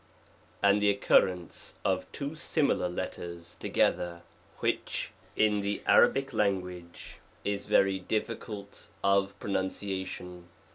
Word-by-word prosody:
lj, - - +6
and 100 +1 +5
the 105 - +5
occurrence 90 -3 +2
of 95 -1 0
two 140 +1 -4
similar 155 - +1
letters 85 -1 -6
together, 85 -1 +1 0.4
xvhich, - - -1 0.3
in 105 -1 +3
the 100 0 -2
Arabic 135 0 +5
language, 90 -4 -2 0.3
is 100 0 -2
very 95 -1 +4
difficult 105 0 -4
of 100 0 +2
pronunciation. 95 -2 -3
100 Hz, 105 wpm, -30 LUFS, 90-105 Hz, 0.4 s, lj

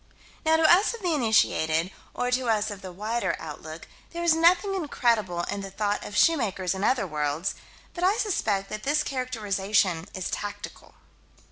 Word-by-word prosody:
Now 320 0 +4
to 325 - +1
us 370 +8 +5
of 460 - -12
the 350 -2 +1
initiated, 185 - +2 0.2
or 245 0 -1
to 250 -1 0
us 215 -1 +1
of 200 -1 -8
the 185 -2 -8
wider 215 +6 -2
outlook, - - -9 0.3
there 340 0 -4
is 340 -2 +5
nothing 350 +4 +3
incredible 230 - 0
in 200 +3 -4
the 195 - -6
thought 205 +1 -2
of 210 - -6
shoemakers 215 - +2
in 190 +1 -4
other 250 -2 +2
worlds 150 +1 -2 0.4
but 350 - -5
I 390 +4 +3
suspect 210 - -1
that 215 0 -5
this 295 +4 +1
characterization 205 - 0
is 185 -1 -4
tactical. 205 0 -7
215 Hz, 170 wpm, -26 LUFS, 195-310 Hz, 0.4 s, us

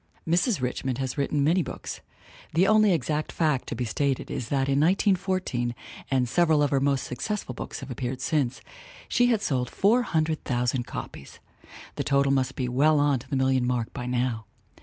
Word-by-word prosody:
Mrs. 180 - +2
Richmond 125 0 -2
has 130 -1 -3
written 140 0 0
many 170 +6 +3
books. - - -6 0.5
The 175 +3 +5
only 215 0 +5
exact 155 -3 -1
fact 150 -6 0
to - - -4
be 125 +1 -2
stated 135 +3 -1
is 115 - -4
that 135 -1 +1
in 140 0 +2
1914 185 - +1 0.3
and 130 -2 +1
several 155 +2 +3
of 145 - +1
her 140 - +3
most 140 -1 +1
successful 130 - -4
books - - -7
have - - -7
appeared 125 +1 -4
since 135 -2 -1 0.5
she 245 - +3
had 225 -3 +1
sold 125 -7 0
400,000 155 - +1
copies. 70 - -8 0.6
The - - -1
total 140 0 +2
must 135 -1 0
be 125 - -2
well 145 +5 +3
on 145 -2 +2
to 130 - -15
the 140 - -1
million 130 -1 +2
mark 120 -2 -1
by 125 - -5
now. 120 -3 -1
140 Hz, 180 wpm, -26 LUFS, 125-160 Hz, 0.6 s, The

